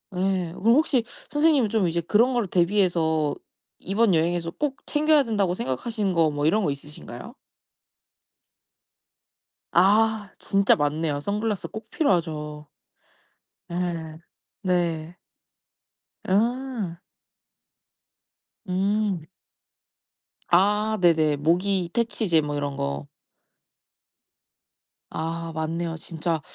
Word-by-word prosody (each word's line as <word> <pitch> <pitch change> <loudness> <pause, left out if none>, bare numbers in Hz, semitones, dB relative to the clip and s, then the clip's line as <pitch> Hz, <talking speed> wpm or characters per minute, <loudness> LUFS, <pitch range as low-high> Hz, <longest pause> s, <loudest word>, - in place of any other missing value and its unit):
예. 185 -2 0
그럼 230 +6 +3
혹시 275 -5 +2 0.3
선생님은 295 -6 +3
좀 215 -5 +2
이제 170 - -1
그런 215 +9 +3
걸 240 -3 +1
대비해서 170 -5 +2 0.4
이번 200 +1 +2
여행에서 165 +1 0
꼭 285 -2 0
챙겨야 305 -1 +3
된다고 205 -7 0
생각하시는 210 - -2
거 165 -2 +3
뭐 145 0 -2
이런 210 +7 +3
거 150 - +1
있으신가요? 145 +2 -9 2.4
아 210 +3 +3
진짜 195 0 +3
맞네요. 150 0 -1
선글라스 210 +5 -2
꼭 220 - -9
필요하죠. 155 - -1 1.0
예. 170 - -5 0.9
네. 175 -3 -1 1.1
아. 225 -3 -1 1.7
음. 190 -2 0 1.2
아 210 +4 +3
네네. 160 -4 +4
모기 175 +4 +1
퇴치제 220 -7 +1
뭐 145 0 -3
이런 145 -1 -3
거. 70 +1 -3 2.0
아 165 +1 -4
맞네요. 165 +1 -2
진짜 165 -1 -3
180 Hz, 190 characters per minute, -25 LUFS, 160-215 Hz, 2.4 s, 네네